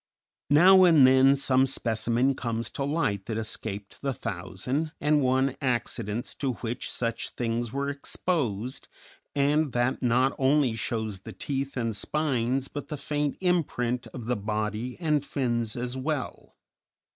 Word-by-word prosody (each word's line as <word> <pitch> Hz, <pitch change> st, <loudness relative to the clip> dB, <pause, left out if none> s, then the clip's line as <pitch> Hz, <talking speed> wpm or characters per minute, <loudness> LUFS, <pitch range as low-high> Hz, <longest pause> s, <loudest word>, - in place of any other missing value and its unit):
Now 185 Hz, +6 st, +7 dB
and 160 Hz, -7 st, +7 dB
then 130 Hz, +1 st, +6 dB
some 135 Hz, -1 st, +2 dB
specimen 120 Hz, +1 st, +1 dB
comes 115 Hz, -2 st, -3 dB
to 140 Hz, -, -3 dB
light 115 Hz, -, -1 dB
that 110 Hz, -2 st, -2 dB
escaped 105 Hz, -2 st, -4 dB
the 135 Hz, -2 st, -1 dB
thousand 115 Hz, -, -3 dB
and 150 Hz, 0 st, +3 dB
one 130 Hz, +1 st, +2 dB
accidents 120 Hz, -3 st, -2 dB
to 135 Hz, -3 st, -1 dB
which 120 Hz, +1 st, -4 dB
such 115 Hz, -1 st, -2 dB
things 115 Hz, -1 st, -2 dB
were 140 Hz, +2 st, -2 dB
exposed, 135 Hz, -, -2 dB, 0.5 s
and 145 Hz, 0 st, +2 dB
that 120 Hz, +2 st, 0 dB
not 125 Hz, +2 st, +3 dB
only 135 Hz, -2 st, +3 dB
shows 110 Hz, -3 st, -3 dB
the -, -, -10 dB
teeth 135 Hz, -1 st, -3 dB
and 115 Hz, -3 st, -1 dB
spines 135 Hz, 0 st, 0 dB
but 145 Hz, -, -7 dB
the 150 Hz, -, -5 dB
faint 145 Hz, 0 st, -2 dB
imprint 125 Hz, -9 st, 0 dB
of 120 Hz, -4 st, -8 dB
the 125 Hz, +1 st, 0 dB
body 105 Hz, +3 st, -3 dB
and 150 Hz, -4 st, +1 dB
fins 120 Hz, -6 st, -1 dB
as 125 Hz, +1 st, -3 dB
well. 130 Hz, 0 st, -4 dB
130 Hz, 145 wpm, -27 LUFS, 115-140 Hz, 0.5 s, Now